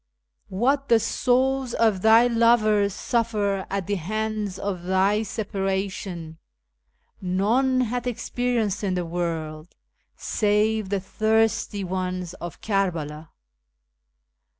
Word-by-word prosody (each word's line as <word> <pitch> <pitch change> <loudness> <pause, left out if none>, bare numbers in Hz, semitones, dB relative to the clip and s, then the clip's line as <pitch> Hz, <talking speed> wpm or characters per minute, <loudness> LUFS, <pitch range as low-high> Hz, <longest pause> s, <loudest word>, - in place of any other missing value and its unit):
" 65 0 -36
Wliat 270 +8 +1
tlie 230 -1 +5
souls 260 +2 +1
of 215 -5 +2
thy 225 +3 +6
lovers 225 -4 +3
suffer 205 -3 -1
at 195 -1 -2
the 205 +2 -1
hands 215 +2 -3
of 195 -3 -3
thy 190 +4 +2
separation 195 -5 -3 0.8
None 225 +8 +1
hath 245 +1 -2
experienced 235 -4 -1
in 190 -2 0
the 180 -1 -2
world, 165 -1 -4 0.4
save 210 -1 0
the 200 0 0
thirsty 220 +1 0
ones 185 -1 -3
of 175 -2 -8
Kerbela." 165 -7 -2
205 Hz, 105 wpm, -24 LUFS, 185-225 Hz, 0.8 s, thy